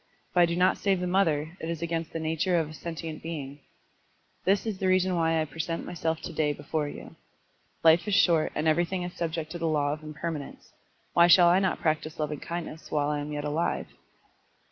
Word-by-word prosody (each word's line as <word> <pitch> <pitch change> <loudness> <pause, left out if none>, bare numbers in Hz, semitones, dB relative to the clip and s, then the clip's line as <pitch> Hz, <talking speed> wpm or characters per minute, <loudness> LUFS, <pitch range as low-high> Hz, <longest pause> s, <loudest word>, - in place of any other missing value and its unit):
If - - -7
I 175 -1 +6
do 170 - -1
not 180 +1 +3
save 195 -2 +1
the 180 - -2
mother, 165 -4 +1
it 160 - -5
is 170 -1 -3
against 165 -1 -2
the 165 - -4
nature 160 +3 0
of 160 -2 +1
a - - -9
sentient 165 -1 -6
being. 145 -4 -6 0.9
This 195 +3 +2
is 210 -4 -3
the 190 - 0
reason 185 0 +3
why 165 -1 +2
I 155 - +1
present 165 +3 -4
myself 165 -2 -2
to - - -6
day 150 -2 +1
before 150 +1 -3
you. - - -10 0.7
Life 165 +2 +5
is 205 - +2
short 165 -5 +4
and 155 +1 0
everything 175 +3 +1
is 175 0 -5
subject 160 -2 -3
to 175 - -5
the 165 - 0
law 145 -2 +1
of 155 - -7
impermanence. 155 -1 -6 0.4
Why 170 0 +6
shall 175 0 +7
I 180 +2 +5
not 190 -1 0
practise 155 -1 -1
lovingkindness 155 +2 -5
while 145 -1 0
I 150 0 -1
am 145 +1 -5
yet 145 0 -3
alive?" 150 +3 -1
165 Hz, 210 wpm, -28 LUFS, 155-175 Hz, 0.9 s, shall